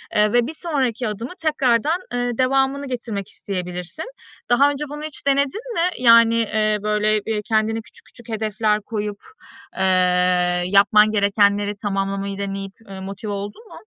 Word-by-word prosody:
Eee, 210 0 +3
ve 240 -1 +3
bir 310 - -6
sonraki 260 -8 -2
adımı 225 - -5
tekrardan, 300 0 +1
eee, 245 0 -1
devamını 270 +2 +1
getirmek 230 -6 -4
isteyebilirsin. 180 - -6 0.4
Daha 275 +4 +5
önce 290 +1 -4
bunu 295 +1 -7
hiç 310 -2 -6
denedin 280 - 0
mi? 350 -3 +1
Yani, 230 -1 +6
eee, 215 -2 +1
böyle, 210 0 +1
eee, 220 -1 -1
kendine 220 +1 0
küçük - - -15
küçük 240 -1 -9
hedefler 215 -1 0
koyup, 210 -1 -4 0.6
eee, - - -2 0.8
yapman 205 +3 +5
gerekenleri 205 0 +2
tamamlamayı 195 -1 -2
deneyip, 195 -1 -4 0.2
eee, 195 -1 -8
motive 195 +2 -6
oldun 205 - -6
mu? - - -12
220 Hz, 145 wpm, -21 LUFS, 205-255 Hz, 0.8 s, Yani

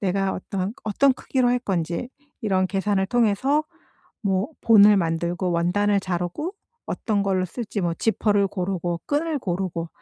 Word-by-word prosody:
내가 195 0 0
어떤 190 0 -3
그 - - -23
어떤 260 +6 +3
크기로 255 -1 0
할 245 - +2
건지 175 +1 -2 0.3
이런 190 -3 +2
계산을 195 0 0
통해서 245 +7 +2 0.6
뭐 195 +3 0
본을 210 -2 +7
만들고 170 +2 -1
원단을 200 +4 +2
자르고 185 - -3 0.3
어떤 205 -3 -1
걸로 190 -2 +1
쓸지 210 +1 -4
뭐 170 -1 0
지퍼를 205 0 +1
고르고 180 -3 -2
끈을 305 +1 0
고르고 175 -4 -3
195 Hz, 305 characters per minute, -24 LUFS, 180-220 Hz, 0.6 s, 본을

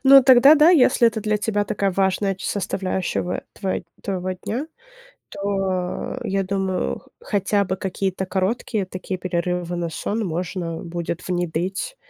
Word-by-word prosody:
Ну, 270 0 +9
тогда 265 +3 +8
да. 310 +3 +6
Если 250 -7 +5
это 220 -1 -4
для 210 0 +1
тебя 210 -1 0
такая 200 -1 0
важная 195 +1 +1
ч 190 - -7
составляющего 185 -2 -2
твой 190 -2 -3 0.2
твоего 185 -2 -2
дня, 230 - -4 0.6
то 195 +2 -2
я 195 -2 0
думаю, 190 -1 -1
х - - -23
хотя 200 - +1
бы 185 0 -2
какие-то 190 0 -2
короткие 195 +2 -1
такие 185 0 -5
перерывы 180 -1 -2
на 170 -1 -2
сон 215 +7 -2
можно 170 0 -3
будет 170 0 -4
внедрить. 180 - -2
190 Hz, 145 wpm, -22 LUFS, 180-210 Hz, 0.6 s, Ну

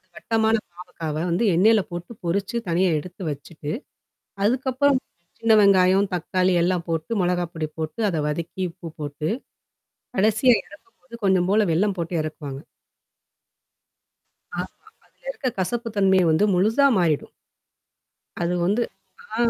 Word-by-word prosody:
வட்டமான 225 0 +1 0.2
பாவக்காவ 165 -3 -6
வந்து 175 +6 +1
எண்ணெயில 215 +4 +5
போட்டு 175 +4 -6
பொரிச்சு, 195 +6 -1
தனியா 175 +2 +2
எடுத்து 180 +4 -10
வச்சுட்டு. 145 +1 -7 0.7
அதுக்கப்புறம், 260 +4 +2 0.4
சின்ன 225 0 +3
வெங்காயம், 195 0 +5
தக்காளி 185 +1 +1
எல்லாம் 175 -1 0
போட்டு 165 +6 -2
மொளகாப்பொடி 175 -3 -1
போட்டு, 160 +8 -4
அத 160 - -1
வதக்கி 170 +4 -3
உப்பு 165 0 -9
போட்டு, 150 +1 -3 0.9
கடைசியா 220 +5 +4
இறக்கும் 205 - -18
போது, 255 -2 -16
கொஞ்சம் 185 -2 +3
போல 210 +1 +4
வெல்லம் 195 +4 +1
போட்டு 170 +1 -3
இறக்குவாங்க. 145 -3 -6 1.9
ஆமா. - - -2 0.4
அதிலிருக்க - - -5
கசப்பு 235 +5 -1
தன்மைய 190 -2 +4
வந்து 160 +6 +3
முழுசா 220 +10 +4
மாறிடும். 160 -5 +1 1.1
அது 170 +1 0
வந்து. 210 +6 +2 0.5
ஆ. - - -2
185 Hz, 120 wpm, -23 LUFS, 170-220 Hz, 1.9 s, எண்ணெயில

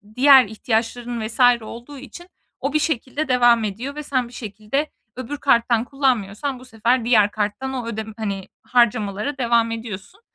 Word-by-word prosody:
diğer 265 -1 +7
ihtiyaçların 225 +1 -2
vs. 230 - -10 0.2
olduğu 240 +6 -10
için 280 +7 -11 0.3
o 275 +1 -2
bir 305 - +3
şekilde 300 0 -2
devam 240 -3 +4
ediyor 230 +7 -4
ve 300 - -5
sen 255 -4 -1
bir 240 - -16
şekilde 220 +6 -3 0.3
öbür 255 +3 -5
karttan 235 -2 +2
kullanmıyorsan 260 -2 -1
bu 255 - -14
sefer 230 +1 0
diğer 210 -4 +4
karttan 215 +6 -3
o 245 -3 -4
ödem 220 -1 -5
hani, 200 -3 -4 0.2
harcamalara 225 +1 +1
devam 235 -2 +2
ediyorsun. 225 - -7
240 Hz, 155 wpm, -21 LUFS, 220-265 Hz, 0.3 s, diğer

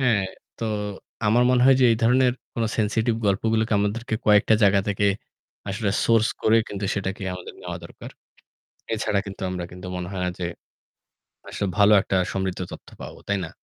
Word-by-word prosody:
হ্যাঁ 115 -7 +2 0.3
তো 115 - -3 0.6
আমার 115 +3 +4
মনে 125 -1 +4
হয় 135 0 +7
যে 130 - +6
এই - - +1
ধরনের 125 +2 +4 0.2
কোন 115 - 0
সেনসিটিভ 110 +1 +1
গল্পগুলোকে 110 +3 +1
আমাদেরকে 110 +3 -1
কয়েকটা 105 +1 +5
জায়গা 100 -1 +5
থেকে 100 0 +1 0.6
আসলে 100 +1 -1
সোর্স 115 -1 +4
করে 110 +1 +5
কিন্তু 100 0 -5
সেটাকে 100 0 -3
আমাদের 90 - -9
নেওয়া - - -5
দরকার। - - -11 0.8
এছাড়া 105 -2 0
কিন্তু 100 +1 -9
আমরা 90 -1 -4
কিন্তু 90 +1 -10
মনে 90 -1 -4
হয় 95 - -4
না - - 0
যে 90 - -2 1.0
আসলে 100 - -3
ভালো 100 +1 +6
একটা 95 - -2 0.2
সমৃদ্ধ 95 -1 -2
তথ্য - - -10
পাব, - - -7 0.2
তাই 100 - +2
না? - - -9
105 Hz, 170 wpm, -24 LUFS, 95-115 Hz, 1.0 s, হয়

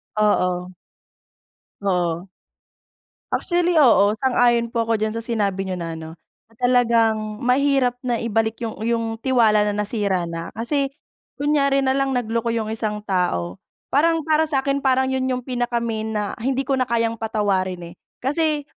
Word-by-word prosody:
Oo. 180 -4 +1 1.1
Oo. 180 -2 -1 1.0
Actually 350 0 +1
oo, 220 -8 +5
sang-ayon 240 -1 +2
po 230 -1 -1
ako 230 - +2
diyan 215 0 -1
sa 230 - -3
sinabi 205 -5 -1
niyo 185 - -2
na 170 -2 -5
ano, 160 0 -8 0.4
na 225 - -26
talagang 230 -3 +1
mahirap 255 -1 +2
na 245 -2 -1
ibalik 225 0 0
yung 225 -1 -5
yung 230 -1 0
tiwala 225 -5 +3
na 205 - -1
nasira 205 -3 -1
na 165 0 -5
kasi 275 +5 0 0.5
kunyari 280 -1 +2
nalang 270 0 +1
nagloko 230 -1 -1
yung 220 -1 -2
isang 210 -2 -2
tao, 175 - -1 0.3
parang 325 +3 +3
para 315 +1 +2
sakin 275 -1 0
parang 265 -1 +2
yun 260 0 0
yung 250 -1 -2
pinaka-main 235 -3 -2
na 210 -2 -2
hindi 265 +3 0
ko 270 0 0
na 255 - +1
kayang 230 -1 0
patawarin 190 -5 -1
eh. - - -13 0.3
Kasi 300 +2 +1
230 Hz, 145 wpm, -22 LUFS, 210-265 Hz, 1.1 s, oo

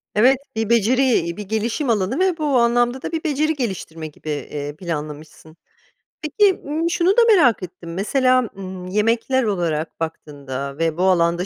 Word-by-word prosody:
Evet, 255 +6 +5 0.2
bir 225 -1 -1
beceri, 235 -6 +2
bir 210 - -5
gelişim 220 +7 -2
alanı 215 - 0
ve 370 -2 +2
bu 310 - -2
anlamda 240 +2 +2
da - - -5
bir 325 -1 -3
beceri 310 0 +1
geliştirme 190 - -5
gibi, 155 0 -10
eee, 145 0 -5
planlamışsın. 155 -1 -7 0.6
Peki, 380 +6 +2
ımm, 315 +3 -1
şunu 345 +1 +1
da - - +7
merak 245 - +3
ettim: 175 -1 -8
Mesela, 255 +5 +2
ımm, 185 -1 -7
yemekler 225 +6 +1
olarak 170 -7 -2
baktığında 140 -4 -6
ve 165 0 -1
bu 180 - 0
alanda 175 -1 +2
210 Hz, 155 wpm, -21 LUFS, 165-260 Hz, 0.6 s, da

